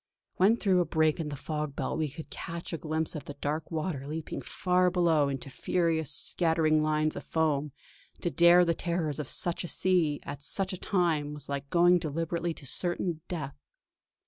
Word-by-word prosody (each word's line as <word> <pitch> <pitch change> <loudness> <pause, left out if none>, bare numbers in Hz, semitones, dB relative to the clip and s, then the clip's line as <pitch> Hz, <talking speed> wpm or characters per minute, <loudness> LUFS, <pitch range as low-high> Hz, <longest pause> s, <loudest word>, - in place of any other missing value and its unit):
When 205 +5 +5
through 190 -5 +3
a - - +1
break 155 0 +2
in 155 -2 -2
the 145 - -4
fog 150 0 -4
belt - - -2
we 155 -2 0
could 155 +3 -10
catch 170 -1 -6
a - - -1
glimpse 160 0 -1
of 150 - -6
the 145 - -7
dark 150 +2 -3
water 155 -4 -3
leaping 155 +1 -5
far 180 0 +1
below 165 -5 +3
into 135 0 -5
furious, 165 -1 0
scattering 160 0 +2
lines 155 0 +1
of - - -6
foam, 150 -3 0 0.5
to 175 - -1
dare 175 +1 +6
the 170 - +2
terrors 165 -3 -2
of 145 - -4
such 175 0 0
a - - -4
sea 170 -5 +1
at 145 - -7
such 190 +6 -2
a 185 - -6
time 160 -7 0
was 145 -1 -10
like 140 0 -4
going 175 0 +5
deliberately 165 +2 -2
to 140 - -12
certain 175 +3 -1
death. 140 -6 -4
160 Hz, 190 wpm, -29 LUFS, 150-175 Hz, 0.5 s, dare